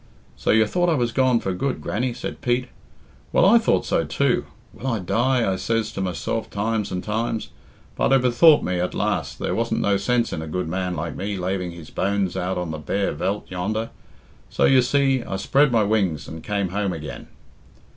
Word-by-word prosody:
"So - - -4
you 110 0 +5
thought 175 +10 +1
I 165 - +3
was 120 -4 0
gone 130 0 +3
for 95 - -2
good, 125 +8 -2
Grannie?" 120 +3 -2
said - - -6
Pete. 125 +1 0 0.6
"Well, - - +4
I - - +7
thought - - +1
so - - +1
too. - - 0 0.3
'Will 130 - -7
I 115 -3 +1
die?' 115 +7 +1
I - - -3
says 115 +1 -1
to 95 - -4
myself 95 +4 -2
times 105 +1 -1
and 90 -1 -3
times; 110 +1 -2 0.5
but - - +1
I 135 - +7
bethought 130 +5 +5
me 90 -1 -1
at 90 - -2
last - - -1
there - - -2
wasn't - - 0
no 100 -1 +2
sense 120 +4 0
in 80 - -3
a 80 - -6
good 90 +2 -3
man 90 +1 -2
like 80 -1 -4
me 100 +1 -3
laving 90 0 -2
his 85 -2 -11
bones 100 -2 0
out 90 +1 -2
on 90 -2 -3
the 80 - -5
bare 100 +7 -1
Veldt 100 +8 -3
yonder; 110 +5 -2 0.6
so, - - +2
you 130 -1 +6
see, 135 0 +2
I 100 - -5
spread 140 +8 +3
my 115 -2 +3
wings 95 -9 0
and 80 0 -8
came 100 -3 -1
home 100 0 -1
again." 75 -2 -7
105 Hz, 205 wpm, -23 LUFS, 90-120 Hz, 0.6 s, I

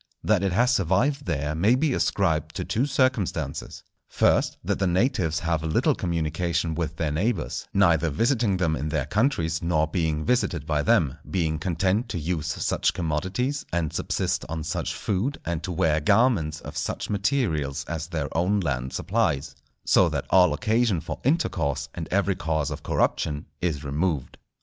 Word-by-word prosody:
That 105 -3 +3
it 100 -1 0
has 120 +7 +3
survived 125 - +1
there 75 +1 -1
may 100 +10 +3
be 145 +1 +1
ascribed 85 - 0
to - - -3
two 125 +6 0
circumstances: 130 -7 -1 0.2
first, - - +2
that - - -1
the 95 - +2
natives 90 - +1
have 85 -2 0
little 80 0 +2
communication 85 0 -1
with 80 0 -3
their 80 -3 -1
neighbours, 90 +2 -1
neither 85 -4 +3
visiting 115 - +1
them 85 -4 +1
in 75 +2 -3
their 75 -4 -1
countries 80 - 0
nor 85 -2 +2
being 80 -2 -1
visited 90 - 0
by 75 -2 0
them; 70 0 +2
being 80 -4 0
content 95 +7 0
to 100 - -3
use 80 -1 -2
such 80 - 0
commodities, 95 - -1
and 85 -3 -1
subsist - - -1
on 80 -1 -3
such 80 - -3
food, 105 +9 -1
and 85 -1 -2
to 90 - -4
wear 80 -2 +2
garments 100 - +2
of - - -9
such - - -3
materials 85 - 0
as 80 0 -4
their 80 -6 -4
own 90 +5 +2
land 65 -7 -2
supplies; 80 - 0 0.3
so - - +5
that - - -3
all 90 -3 +6
occasion 110 +2 +1
for - - -6
intercourse, 70 - 0
and 80 -2 -5
every 100 0 +1
cause 80 -4 -1
of - - -5
corruption 75 -1 0 0.2
is 80 -5 -1
removed. 75 -1 -2
85 Hz, 165 wpm, -25 LUFS, 75-100 Hz, 0.3 s, all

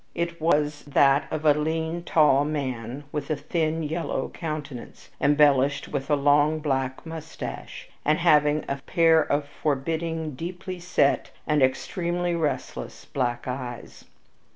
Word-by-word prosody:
It 170 -1 -3
was 150 -2 +1
that 140 0 +4
of 155 0 -4
a 150 - +7
lean, 160 +3 -2
tall 150 -5 +4
man 135 -3 -3
with 145 -2 -4
a 155 - +1
thin, 160 +2 -1
yellow 160 +3 -2
countenance, 150 -6 -7
embellished 145 -1 +3
with 140 -1 -3
a 150 - +4
long, 145 +2 +3
black 135 -3 -2
mustache, 160 -1 -7 0.2
and 150 +1 +3
having 150 -3 +3
a 140 - -2
pair 165 +2 +3
of 145 -1 -1
forbidding, 160 +2 -2
deeply 180 +5 -6
set, 170 -5 +1 0.2
and 150 -2 +2
extremely 175 +6 0
restless 160 -3 -3
black 120 -2 -2
eyes. 125 -2 -6
150 Hz, 130 wpm, -25 LUFS, 140-160 Hz, 0.2 s, a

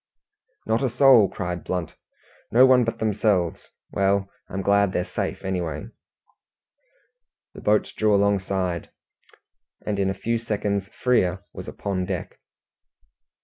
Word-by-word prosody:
"Not 110 +1 +1
a 135 - +1
soul!" 120 -4 +6
cried 90 -1 -4
Blunt. 90 -3 -3 0.6
"No 125 +4 +7
one 130 -1 +5
but 115 - -2
themselves. 105 -5 0 0.2
Well, 100 0 +1 0.2
I'm 95 0 -4
glad 100 -1 +3
they're 90 - 0
safe - - -4
anyway." 95 +2 -3 1.6
The - - -11
boats 105 0 +1
drew 110 -1 +2
alongside, 95 -3 0 1.0
and 105 -1 -2
in 95 -1 +1
a 95 - -2
few 115 +4 -1
seconds 105 -3 -2
Frere 100 -5 0
was - - -8
upon 95 -2 -3
deck. 95 -3 -5
100 Hz, 125 wpm, -24 LUFS, 95-110 Hz, 1.6 s, No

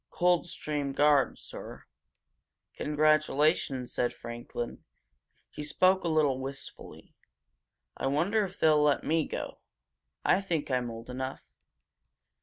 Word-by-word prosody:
Coldstream 160 -5 0
Guards, 145 -2 +3
sir." - - -9 0.9
"Congratulations!" 150 -3 +2
said 120 - 0
Franklin. 120 0 -6 0.7
He - - -7
spoke 185 +5 +3
a - - -1
little 150 -5 +2
wistfully. 135 +1 -8 0.8
"I - - -2
wonder 175 +10 +2
if 190 -1 -7
they'll 155 -1 +5
let 145 -1 +3
me 160 0 +1
go? - - -5 0.7
I 190 - +4
think 165 -7 -2
I'm 125 -1 0
old 115 0 -8
enough! 130 +1 -5
150 Hz, 110 wpm, -29 LUFS, 135-160 Hz, 0.9 s, they'll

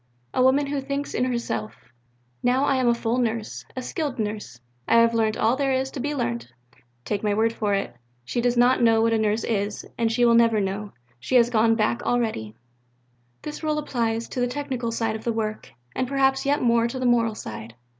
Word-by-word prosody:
A - - +1
woman 265 +3 +4
who 280 0 -2
thinks 280 +1 -4
in 250 - +1
herself: 115 - -3 0.7
'Now 255 +3 +2
I 275 - +2
am 255 -1 +1
a 235 - +5
full 235 +1 -1
Nurse, 230 -2 -2
a 255 - -4
skilled 290 -2 -3
Nurse, 210 - -4 0.3
I - - +3
have 230 0 +5
learnt 220 -1 +1
all 225 +3 +2
that 280 - -2
there 270 - +1
is 265 +1 -1
to - - -6
be 290 +3 -2
learnt' 120 - -2 0.6
take 205 -1 -2
my 210 -1 0
word 225 +1 +2
for 210 -3 0
it, 195 -11 -3 0.3
she 240 - -1
does 245 0 +1
not 245 +1 +4
know 225 -1 +4
what 230 0 +2
a 225 - +2
Nurse 215 +1 +1
is, 205 -2 -2
and 230 -1 +2
she 240 +1 +3
never 230 -1 +5
will 205 - +1
know; 200 +2 -5 0.3
she 255 - -2
is 235 0 +4
gone 225 0 +3
back 225 +2 0
already." 220 - -1 0.9
This 300 - -6
rule 305 -1 0
applies 230 -6 -1
to - - -4
the 245 - +2
technical 255 -3 -3
side 225 -1 -1
of 220 - -7
the 235 - 0
work, 215 -1 -3 0.3
and 260 - -1
perhaps 270 0 +1
yet 285 0 +2
more 235 -1 +3
to 235 - -5
the 255 - -2
moral 230 -2 +2
side. 110 - -8
235 Hz, 220 wpm, -24 LUFS, 220-255 Hz, 0.9 s, a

